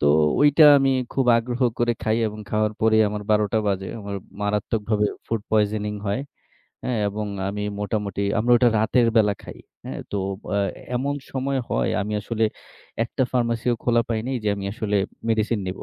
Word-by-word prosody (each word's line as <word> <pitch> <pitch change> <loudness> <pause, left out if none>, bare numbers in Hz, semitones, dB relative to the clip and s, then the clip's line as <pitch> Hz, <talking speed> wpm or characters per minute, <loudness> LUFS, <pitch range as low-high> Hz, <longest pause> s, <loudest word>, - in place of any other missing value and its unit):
তো - - +2 0.3
ঐটা 145 +2 +6
আমি 135 0 +2 0.2
খুব 135 -2 0
আগ্রহ 120 +2 -4 0.2
করে 120 0 +2
খাই 110 0 +1
এবং 105 0 -9
খাওয়ার 110 0 +1
পরেই 110 0 +4
আমার 105 0 -4
১২ 105 0 +4
টা 110 - +3
বাজে। 95 -1 -1
আমার 100 -1 -5 0.3
মারাত্মকভাবে 105 0 0 0.2
ফুড 115 -1 -1
পয়জনিং 105 -1 +1
হয়, 100 +6 0 0.6
হ্যাঁ? 125 -3 -1
এবং 105 +1 -4 0.2
আমি 105 +1 -3 0.2
মোটামুটি 100 -1 -2 0.2
আমরা 120 +3 +2
ওটা 120 0 +5
রাতের 115 +3 +3
বেলা 105 -2 +4
খাই, - - -10 0.3
হ্যাঁ? - - -5
তো - - -2 0.4
আ - - +2 0.4
এমন 140 +3 -1 0.2
সময় 135 +1 -1
হয় - - +1
আমি 105 +1 -3
আসলে 115 +1 -1 0.6
একটা 130 +3 -2
ফার্মেসিও 120 -1 +1
খোলা 120 -1 +3
পাই 115 -2 0
নাই 130 0 -1
যে 105 - +2
আমি 100 -1 -6
আসলে 105 -3 -1 0.3
মেডিসিন 110 0 +1
নিবো। 90 +1 -5
110 Hz, 175 wpm, -23 LUFS, 105-120 Hz, 0.6 s, ঐটা